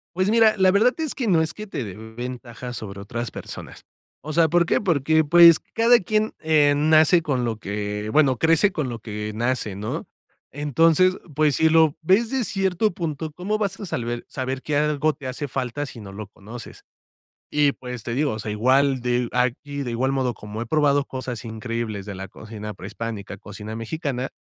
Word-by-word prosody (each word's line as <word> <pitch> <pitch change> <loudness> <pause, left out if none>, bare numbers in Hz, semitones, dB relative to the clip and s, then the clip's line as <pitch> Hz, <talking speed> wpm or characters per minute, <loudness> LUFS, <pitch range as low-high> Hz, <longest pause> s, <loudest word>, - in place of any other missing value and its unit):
Pues 185 +2 +1
mira, 225 -1 +5
la 190 -1 +5
verdad 220 +6 +4
es 315 -4 -2
que 250 -5 -3
no 170 -5 +4
es 160 0 -1
que 215 0 -8
te 165 - -4
dé 100 -4 -7
ventaja 120 +2 -7
sobre 100 -4 -7
otras 120 +4 -4
personas. - - -9 0.4
O 155 - -6
sea, 165 0 +4
¿por 175 +2 +3
qué? - - +1
Porque, 160 -4 +2
pues, 170 +1 +8
cada 235 +1 +5
quien, 215 +3 0
eh, 150 -2 +4
nace 155 +3 +5
con 135 -6 -1
lo 115 -2 -2
que 105 +1 -4
bueno, 140 -4 +4
crece 165 - +4
con 155 -7 -2
lo 115 -1 -5
que 105 -1 -5
nace, 120 -3 -1
¿no? 105 +2 -4 0.4
Entonces, 165 +6 +3 0.2
pues, 150 -2 +3
si 160 - +4
lo 160 -1 +4
ves 200 +8 +3
de 265 -2 0
cierto 195 +1 0
punto, 160 -4 -4
¿cómo 185 +7 -2
vas 205 -3 -2
a 200 - -5
salber 120 -6 -3
saber 130 0 -4
que 150 - -2
algo 150 +1 +2
te 140 -4 -9
hace 140 +3 -4
falta, 135 +2 -3
si 120 -3 -9
no 100 -2 -9
lo 105 +1 -7
conoces? 110 +4 -11 0.7
Y 145 -1 +3
pues, 125 -2 -8
te 115 - -4
digo, 145 +2 +1
o 110 - -4
sea, 105 - -5
igual 130 +5 +2
de 125 0 0
aquí, 135 +3 -1
de 125 - -4
igual 130 +3 0
modo, 130 -3 0
como 105 +1 -8
he 120 - -4
probado 145 +1 +2
cosas 130 -3 -6
increíbles 110 -2 -4
de 105 0 -7
la 95 +1 -7
cocina 105 +1 -8
prehispánica, 105 +1 -6
cocina 105 +2 -8
mexicana, 130 +2 -3
135 Hz, 195 wpm, -23 LUFS, 115-160 Hz, 0.7 s, pues